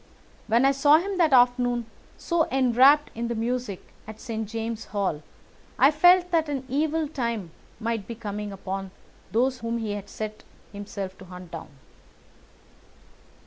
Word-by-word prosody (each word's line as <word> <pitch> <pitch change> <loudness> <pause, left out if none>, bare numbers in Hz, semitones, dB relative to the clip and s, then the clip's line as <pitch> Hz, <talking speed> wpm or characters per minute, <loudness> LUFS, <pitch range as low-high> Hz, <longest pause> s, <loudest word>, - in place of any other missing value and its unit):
When 235 +4 +3
I 275 - +5
saw 290 +2 +5
him 380 +3 -3
that 325 -3 +4
afternoon 245 -1 +3 0.3
so 340 -2 0
enwrapped 265 +3 +4
in 235 +1 -3
the 235 - -2
music 230 -3 -3
at 220 0 -9
St. 220 -4 -5
James's 225 0 -4
Hall 195 -7 -2 0.6
I 270 +5 +6
felt 355 +3 +5
that 325 -3 +2
an 275 -2 -3
evil 305 +3 0
time 235 - -3 0.3
might 225 -3 -3
be 235 - -6
coming 210 -2 -5
upon 195 0 -5 0.4
those 255 +3 +1
whom 230 +1 -2
he 220 -2 -3
had 205 -1 -6
set 215 0 -6 0.3
himself 200 -2 -6
to 190 - -11
hunt 180 -1 -11
down. 165 -2 -7
235 Hz, 150 wpm, -25 LUFS, 210-275 Hz, 0.6 s, I